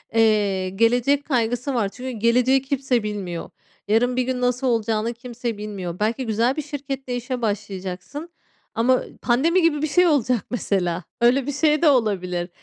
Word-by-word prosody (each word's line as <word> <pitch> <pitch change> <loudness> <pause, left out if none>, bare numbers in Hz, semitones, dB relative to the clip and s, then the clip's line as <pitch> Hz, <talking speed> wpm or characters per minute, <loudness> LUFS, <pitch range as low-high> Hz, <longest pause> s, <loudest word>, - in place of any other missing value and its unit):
eee, 205 -4 +2
gelecek 245 +8 +2
kaygısı 245 0 0
var. 225 -5 0
Çünkü 255 +5 -7
geleceği 250 +4 +3
kimse 265 -3 0
bilmiyor. 195 -5 -4 0.4
Yarın 240 +4 +2
bir 255 - +1
gün 250 0 -2
nasıl 250 +1 +1
olacağını 225 -1 0
kimse 240 -2 -5
bilmiyor. 195 -5 -6
Belki 230 +5 0
güzel 230 +4 +1
bir 305 - -2
şirkette 270 -3 -5
işe 245 0 -4
başlayacaksın 205 - -4 0.5
ama, 245 +3 +3
ııı, - - -3
pandemi 315 +10 +3
gibi 310 -3 +2
bir 310 - +1
şey 355 +4 +4
olacak 250 - +1
mesela, 180 -6 -1 0.2
öyle 250 +3 +3
bir - - 0
şey 300 +1 +2
de 325 - +6
olabilir. 185 -8 0
240 Hz, 160 wpm, -23 LUFS, 210-265 Hz, 0.5 s, de